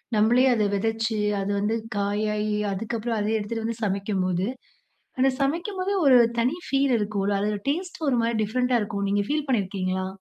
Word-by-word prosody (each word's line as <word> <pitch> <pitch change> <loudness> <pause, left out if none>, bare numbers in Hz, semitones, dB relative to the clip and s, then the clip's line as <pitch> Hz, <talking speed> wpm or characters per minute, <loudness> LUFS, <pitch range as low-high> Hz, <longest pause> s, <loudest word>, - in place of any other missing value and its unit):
நம்மளே 235 +5 +4
அத 220 -3 +1
விதைச்சு 225 +2 -1 0.2
அது 195 +1 -2
வந்து 210 +3 0 0.2
காயாகி 210 +1 0 0.2
அதுக்கப்புறம் 225 +2 -3
அதை 210 +1 -1
எடுத்துட்டு 220 +2 -4
வந்து 230 0 -4
சமைக்கும்போது, 190 -2 -1 0.7
அந்த 265 +1 +4
சமைக்கும்போதே 370 +7 -1
ஒரு 255 -2 +8 0.2
தனி 255 +8 +1
ஃபீல் 275 -1 +2
இருக்கும் 205 -2 -2
இல்ல. 205 - +1
அதோட 210 0 -1
டேஸ்ட் 350 +4 -3
ஒரு 260 - +2
மாரி 230 0 0
டிஃப்ரெண்ட்டா 250 +3 +1
இருக்கும். 200 -1 -3
நீங்க 205 0 +1
ஃபீல் 300 0 -1
பண்ணியிருக்கீங்களா? 190 -5 -1
220 Hz, 160 wpm, -25 LUFS, 205-250 Hz, 0.7 s, ஒரு